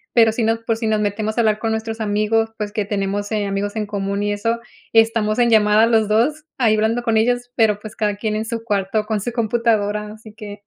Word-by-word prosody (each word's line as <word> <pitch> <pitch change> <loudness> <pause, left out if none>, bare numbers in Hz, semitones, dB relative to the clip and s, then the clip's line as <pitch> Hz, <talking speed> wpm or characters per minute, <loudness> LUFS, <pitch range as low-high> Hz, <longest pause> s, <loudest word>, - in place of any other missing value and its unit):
pero 225 -2 +6
si 230 +1 -2
no 225 +1 +1
por 225 -2 +1
si 225 - -4
nos 215 -1 +1
metemos 210 +2 -2
a - - +4
hablar 215 -2 +2
con 225 0 -1
nuestros 220 0 -3
amigos, 215 +1 +1
pues, 210 -2 -4
que 210 -2 -1
tenemos, 205 +1 -2
eh, 210 -1 0
amigos 200 +1 -3
en 215 -1 -2
común 200 0 -2
y 205 - 0
eso, 230 +3 -1 0.3
estamos 225 -1 +3
en 240 -1 +4
llamada 215 0 +5
los 220 -2 +2
dos 285 +8 +1
ahí 225 -4 +3
hablando 220 +3 0
con 225 -2 +1
ellos, 245 +2 0
pero, 220 -4 +2
pues, 215 0 -10
cada 210 -2 0
quien 215 0 -2
en 220 - -3
su 230 0 -4
cuarto 210 -1 -1
con 215 -1 -1
su 240 - -3
computadora, 215 -3 0
así 220 0 -14
que, 210 -2 -10
220 Hz, 235 wpm, -20 LUFS, 210-225 Hz, 0.3 s, pero